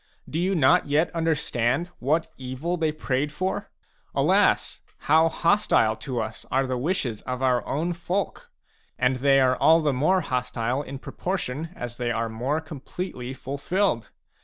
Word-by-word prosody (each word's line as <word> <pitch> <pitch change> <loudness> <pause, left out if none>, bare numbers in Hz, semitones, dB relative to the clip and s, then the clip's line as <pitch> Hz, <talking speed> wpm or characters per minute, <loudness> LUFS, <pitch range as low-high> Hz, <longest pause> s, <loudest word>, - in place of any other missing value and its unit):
Do 160 - -3
you 190 +2 +1
not 130 -4 +4
yet 150 +5 +2
understand 155 -2 0
what 160 +5 0
evil 130 +7 -3
they 160 -3 0
prayed 145 -1 -1
for? 185 +5 -3 0.5
Alas, - - +2 0.2
how 160 +2 +5
hostile 165 - +3
to 130 -4 -4
us 110 0 -4
are 135 +1 +2
the 130 0 -2
wishes 130 - -1
of 125 +1 -4
our 125 -2 +2
own 165 +5 -1
folk! 175 +2 -3 0.5
And 125 +1 +2
they 135 +1 +4
are 130 -1 +4
all 165 +5 +5
the 150 -3 +1
more 155 +9 +2
hostile 125 -2 -1
in 140 -1 -7
proportion 160 -1 -3
as 120 -1 -6
they 120 -1 -1
are 115 0 -1
more 125 +7 -1
completely 145 -3 -6
fulfilled. 140 - -1
140 Hz, 155 wpm, -25 LUFS, 125-165 Hz, 0.5 s, how